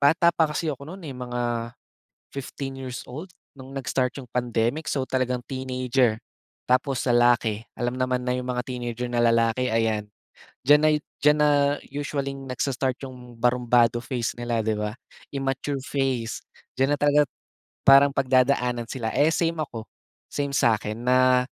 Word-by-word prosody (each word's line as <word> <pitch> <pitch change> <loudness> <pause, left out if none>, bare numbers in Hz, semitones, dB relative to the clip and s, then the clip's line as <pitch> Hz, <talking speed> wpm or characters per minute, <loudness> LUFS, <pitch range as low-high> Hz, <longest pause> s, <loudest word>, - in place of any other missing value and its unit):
bata 165 +4 +5
pa 160 -2 +3
kasi 155 +2 -2
ako 140 0 -9
no'n, 185 +3 -9
eh, 135 - -6
mga 125 -1 -4 0.9
15 135 0 -6
years 130 -2 -6
old, 155 +9 -7 0.3
no'ng 130 +1 -10
nag-start 130 -1 -1
'yong 125 -3 -9
pandemic, 120 +4 -1
so 135 - 0
talagang 125 -1 -1
teenager 130 -3 0 0.5
tapos 130 0 +2
lalaki, 120 -2 +3
alam 120 0 -1
naman 130 -1 0
na 125 - -1
'yong 125 0 -4
mga 125 0 -1
teenager 125 -1 -4
na 120 - 0
lalaki, 115 +2 +2
ayan, 110 -2 +1 0.6
diyan 145 +1 +7
na 155 - +5
'yo 150 - +2 0.2
diyan 150 +1 +5
na 150 0 +5 0.5
usualling 140 -1 -3
nagsa-start 130 0 -1
'yong 125 -2 -10
barumbado 120 -1 +3
phase 120 -3 -2
nila, 120 -1 -1
'di 110 -1 +1
ba. 105 0 -2 0.4
Immature 135 0 -2
phase, 130 -5 -1 0.3
diyan 135 +3 +2
na - - -37
talaga 145 -1 +4 0.6
parang 140 +1 +8
pagdadaanan 130 -3 +2
sila, 115 -4 -3
eh, 150 +2 +4
same 165 0 0
ako, 115 -6 -5 0.5
same 140 -1 -2
sa'kin 110 -3 +1
na 125 0 +4
130 Hz, 155 wpm, -25 LUFS, 120-140 Hz, 0.9 s, parang